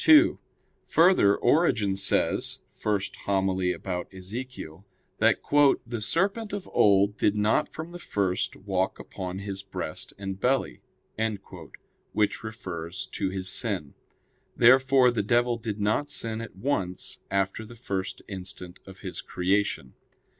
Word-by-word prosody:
2: 310 Hz, +1 st, +7 dB, 0.5 s
Further, 165 Hz, -, +5 dB
Origen 120 Hz, -, +3 dB
says 100 Hz, +1 st, 0 dB, 0.2 s
(Hom. 100 Hz, -2 st, 0 dB
i -, -, 0 dB
in 90 Hz, -1 st, +1 dB
Ezech.) 95 Hz, 0 st, -6 dB, 0.4 s
that -, -, +4 dB, 0.5 s
"the 115 Hz, -1 st, -4 dB
serpent 195 Hz, -, 0 dB
of 200 Hz, -3 st, -4 dB
old 100 Hz, 0 st, +4 dB
did 105 Hz, -, +3 dB
not 105 Hz, +1 st, +2 dB
from 160 Hz, +2 st, -7 dB
the 175 Hz, -, -8 dB
first 95 Hz, -, -1 dB
walk 95 Hz, -1 st, -1 dB
upon 90 Hz, -1 st, -6 dB
his 100 Hz, -1 st, -4 dB
breast 95 Hz, -5 st, -5 dB
and 95 Hz, -1 st, -5 dB
belly"; 130 Hz, +5 st, 0 dB, 1.3 s
which 105 Hz, +1 st, +1 dB
refers 95 Hz, -5 st, -5 dB
to 95 Hz, -, -1 dB
his 95 Hz, -1 st, -4 dB
sin. 90 Hz, -, -2 dB, 0.6 s
Therefore 130 Hz, +1 st, +6 dB
the 120 Hz, -, 0 dB
devil 120 Hz, +3 st, +2 dB
did 110 Hz, -2 st, -4 dB
not 110 Hz, +8 st, +1 dB
sin 115 Hz, -5 st, -3 dB
at 115 Hz, -, -8 dB
once 95 Hz, -5 st, -2 dB
after 100 Hz, +2 st, 0 dB
the 115 Hz, +2 st, -11 dB
first 95 Hz, -4 st, -4 dB
instant 95 Hz, -2 st, -7 dB
of 95 Hz, 0 st, -12 dB
his 95 Hz, -3 st, -5 dB
creation. 95 Hz, -7 st, 0 dB
100 Hz, 130 wpm, -27 LUFS, 95-120 Hz, 1.3 s, 2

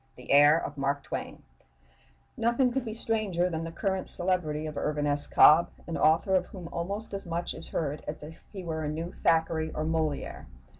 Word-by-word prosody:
THE 125 Hz, -, -8 dB
HEIR 145 Hz, +2 st, +7 dB
OF 145 Hz, 0 st, -7 dB
MARK 140 Hz, +1 st, -1 dB
TWAIN -, -, -6 dB, 0.9 s
Nothing 240 Hz, +2 st, +2 dB
could 265 Hz, 0 st, -1 dB
be 220 Hz, -3 st, -5 dB
stranger 205 Hz, -6 st, 0 dB
than 160 Hz, 0 st, -3 dB
the 165 Hz, -, -6 dB
current 190 Hz, +2 st, -2 dB
celebrity 175 Hz, -4 st, -1 dB
of 155 Hz, -1 st, -6 dB
Irvin 150 Hz, 0 st, -1 dB
S. 145 Hz, 0 st, +3 dB
Cobb, 160 Hz, +3 st, +6 dB, 0.2 s
an 165 Hz, -, -4 dB
author 160 Hz, +5 st, +3 dB
of 185 Hz, -, +2 dB
whom 180 Hz, -4 st, -9 dB
almost 200 Hz, +6 st, -4 dB
as 195 Hz, -, -4 dB
much 170 Hz, +1 st, -2 dB
is -, -, -10 dB
heard 150 Hz, -2 st, -3 dB
as 150 Hz, 0 st, -6 dB
if 160 Hz, +2 st, -11 dB
he 195 Hz, -3 st, -7 dB
were 160 Hz, -2 st, -3 dB
a 150 Hz, -, -2 dB
new 165 Hz, +3 st, -4 dB
Thackeray 160 Hz, -1 st, +1 dB
or 155 Hz, -, -2 dB
Molière. 160 Hz, -2 st, -2 dB
165 Hz, 195 wpm, -28 LUFS, 150-185 Hz, 0.9 s, HEIR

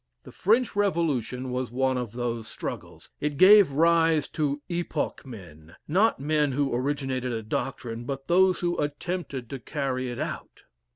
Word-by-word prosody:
The -, -, -12 dB
French 225 Hz, +4 st, +1 dB
Revolution 145 Hz, -, 0 dB
was 125 Hz, 0 st, -2 dB
one 130 Hz, +2 st, 0 dB
of 125 Hz, -4 st, -4 dB
those 120 Hz, -2 st, -3 dB
struggles. -, -, -7 dB
It 150 Hz, -1 st, -2 dB
gave 200 Hz, 0 st, +8 dB
rise 165 Hz, 0 st, +3 dB
to 145 Hz, -2 st, -1 dB
epoch 170 Hz, -5 st, -3 dB
men. 85 Hz, -9 st, -12 dB
Not 195 Hz, -, +2 dB
men 150 Hz, 0 st, +1 dB
who 140 Hz, -1 st, 0 dB
originated 130 Hz, -1 st, -1 dB
a 115 Hz, -1 st, -3 dB
doctrine, 115 Hz, +1 st, -4 dB
but 135 Hz, +1 st, -5 dB
those 185 Hz, +1 st, +4 dB
who 175 Hz, -1 st, -1 dB
attempted 145 Hz, -3 st, -3 dB
to 135 Hz, -, -5 dB
carry 130 Hz, -3 st, -3 dB
it 120 Hz, -, -5 dB
out. 155 Hz, +1 st, -6 dB
140 Hz, 155 wpm, -26 LUFS, 125-165 Hz, -, gave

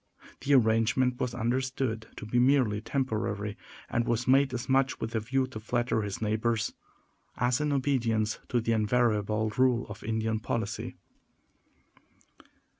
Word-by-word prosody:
The 140 Hz, +1 st, +3 dB
arrangement 120 Hz, +2 st, +3 dB
was 125 Hz, -2 st, -2 dB
understood 125 Hz, -1 st, -1 dB
to -, -, -7 dB
be 120 Hz, +3 st, +1 dB
merely 125 Hz, -5 st, +3 dB
temporary, 105 Hz, -6 st, -2 dB, 0.3 s
and 115 Hz, 0 st, -1 dB
was 120 Hz, +1 st, 0 dB
made 135 Hz, +1 st, +4 dB
as 125 Hz, -1 st, -4 dB
much 135 Hz, 0 st, +2 dB
with 115 Hz, -, -4 dB
a 110 Hz, -, +1 dB
view 130 Hz, +5 st, 0 dB
to 130 Hz, -4 st, -8 dB
flatter 120 Hz, 0 st, 0 dB
his 100 Hz, -2 st, -4 dB
neighbors 110 Hz, +1 st, 0 dB, 0.6 s
as 125 Hz, +3 st, +1 dB
in 150 Hz, -1 st, 0 dB
obedience 115 Hz, -6 st, +1 dB
to 120 Hz, -, +2 dB
the 115 Hz, 0 st, -1 dB
invariable 110 Hz, -1 st, +1 dB
rule 125 Hz, -2 st, +3 dB
of 105 Hz, +1 st, -9 dB
Indian 110 Hz, 0 st, -1 dB
policy. 110 Hz, -1 st, -3 dB
115 Hz, 140 wpm, -29 LUFS, 110-130 Hz, 0.6 s, made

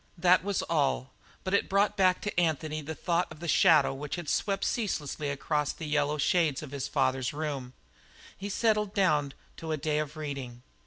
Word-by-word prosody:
That 180 Hz, +1 st, +4 dB
was 200 Hz, 0 st, -1 dB
all, 140 Hz, -4 st, 0 dB, 0.3 s
but 185 Hz, -, -3 dB
it 200 Hz, -, +2 dB
brought 200 Hz, +1 st, +2 dB
back 185 Hz, -2 st, +3 dB
to 210 Hz, -4 st, -1 dB
Anthony 155 Hz, -2 st, 0 dB
the 160 Hz, +2 st, -6 dB
thought 175 Hz, +2 st, 0 dB
of -, -, -10 dB
the 170 Hz, -, -6 dB
shadow 160 Hz, -5 st, +5 dB
which 145 Hz, +2 st, -5 dB
had 175 Hz, -4 st, -5 dB
swept 195 Hz, -1 st, 0 dB
ceaselessly 155 Hz, -, -2 dB
across 145 Hz, +1 st, -1 dB
the 165 Hz, -, -7 dB
yellow 150 Hz, 0 st, +1 dB
shades 155 Hz, -1 st, +1 dB
of 145 Hz, -, -9 dB
his 140 Hz, -2 st, -3 dB
father's 130 Hz, -2 st, 0 dB
room; 145 Hz, -3 st, -3 dB
and 125 Hz, -, -15 dB, 0.6 s
he 200 Hz, +1 st, -6 dB
settled 210 Hz, -1 st, +1 dB
down 150 Hz, -8 st, +2 dB, 0.2 s
to 160 Hz, -1 st, -5 dB
a 155 Hz, -, 0 dB
day 150 Hz, +1 st, 0 dB
of 150 Hz, 0 st, -4 dB
reading. 135 Hz, -5 st, -6 dB
155 Hz, 195 wpm, -29 LUFS, 145-180 Hz, 0.6 s, shadow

